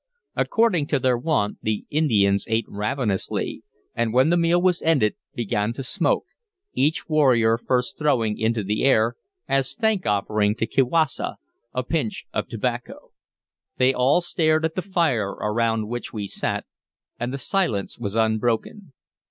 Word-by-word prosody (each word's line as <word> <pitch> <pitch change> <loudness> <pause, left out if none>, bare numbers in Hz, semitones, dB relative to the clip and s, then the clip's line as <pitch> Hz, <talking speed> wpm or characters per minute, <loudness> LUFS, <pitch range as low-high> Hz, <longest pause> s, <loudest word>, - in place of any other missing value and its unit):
According 220 -11 +2
to 145 - +1
their 130 -1 +2
wont 120 -6 -1
the 110 -1 -2
Indians 105 -10 +2
ate 110 0 +1
ravenously, 105 -1 -2 0.3
and 115 -1 0
when 130 +6 +4
the - - +4
meal 170 0 +3
was 180 -1 +2
ended 140 -10 +3 0.2
began 110 -1 -1
to 135 - -6
smoke, 125 - 0 0.5
each 150 +4 0
warrior 130 -8 +4
first 125 +9 -1
throwing 115 -8 +1
into 110 -1 0
the 105 +2 -1
air, 120 -3 +4 0.3
as 135 -1 0
thank 220 -4 +1
offering 105 +1 +1
to 115 - -1
Kiwassa, 135 +5 +1 0.4
a 125 - -2
pinch 135 -5 -2
of - - -2
tobacco. - - -4 0.7
They 130 +1 +4
all 130 +7 +3
stared 160 -2 +1
at 160 - -1
the 185 - -2
fire 160 - 0
around 115 0 0
which 120 +2 -5
we 105 -2 -4
sat, - - -3 0.5
and 120 +1 -2
the 140 - -3
silence 135 - -1
was 105 -3 -4
unbroken. 115 - 0
125 Hz, 150 wpm, -23 LUFS, 110-155 Hz, 0.7 s, when